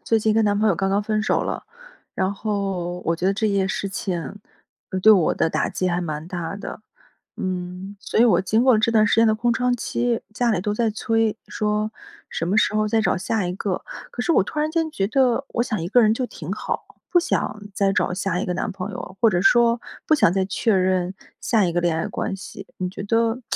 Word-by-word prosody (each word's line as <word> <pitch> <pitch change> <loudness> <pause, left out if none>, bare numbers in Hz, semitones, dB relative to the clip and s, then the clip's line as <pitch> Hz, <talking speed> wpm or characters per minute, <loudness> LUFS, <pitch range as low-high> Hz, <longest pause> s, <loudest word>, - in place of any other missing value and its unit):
最 225 - +2
近 215 0 +2
跟 220 0 +3
男 205 0 +2
朋 215 - +2
友 200 - +4
刚 195 +3 -1
刚 200 +2 +1
分 215 0 0
手 - - +1
了， - - -3 0.5
然 190 +1 0
后 195 -4 -3
我 165 - +1
觉 170 +2 -2
得 195 - +2
这 220 +2 0
件 195 -2 +1
事 195 - -2
情 180 -5 -4 0.7
对 220 - +9
我 180 -6 +3
的 160 - +1
打 - - 0
击 185 - -2
还 175 0 0
蛮 155 -2 -4
大 175 +1 -4
的。 205 - -7 0.6
嗯， 185 +1 -4
所 - - -2
以 235 - +7
我 235 - +4
经 220 +5 +1
过 255 -5 +5
这 220 - +2
段 215 -2 +4
时 - - +3
间 230 - +5
的 220 - +4
空 235 +2 +1
窗 250 +1 +1
期， 240 0 -1
家 240 +2 +1
里 210 - +1
都 210 0 -1
在 225 +1 +1
催， 225 0 0
说： 210 +1 -1 0.4
“什 165 - -2
么 195 - +1
时 215 - +3
候 215 0 +1
再 220 0 +2
找 - - +2
下 205 +1 -1
一 175 - -2
个？” 190 -1 -3 0.3
可 245 - -4
是 335 - +2
我 290 - +5
突 250 - -6
然 305 +1 +1
间 325 -1 0
觉 195 -9 -1
得 260 +2 +2
我 235 - 0
想 215 -7 -2
一 - - -2
个 245 +6 +5
人 220 -1 +4
就 255 - -2
挺 165 -7 -8
好， 215 - -4 0.2
不 350 - +5
想 210 -10 -2
再 195 -1 +2
找 180 - 0
下 180 -1 -1
一 - - -3
个 180 - -1
男 185 - -2
朋 190 +1 -5
友， 185 -1 -8
或 230 - +6
者 180 -4 +1
说 235 +2 +4 0.3
不 315 - +5
想 230 - +4
再 190 0 0
确 220 +2 +1
认 185 -1 +1 0.3
下 220 -6 +2
一 170 - -1
个 175 - +2
恋 175 -2 +2
爱 - - -1
关 - - -3
系。 195 0 -9
你 185 - -2
觉 190 - -7
得 230 +3 +1
205 Hz, 260 characters per minute, -23 LUFS, 185-225 Hz, 0.7 s, 对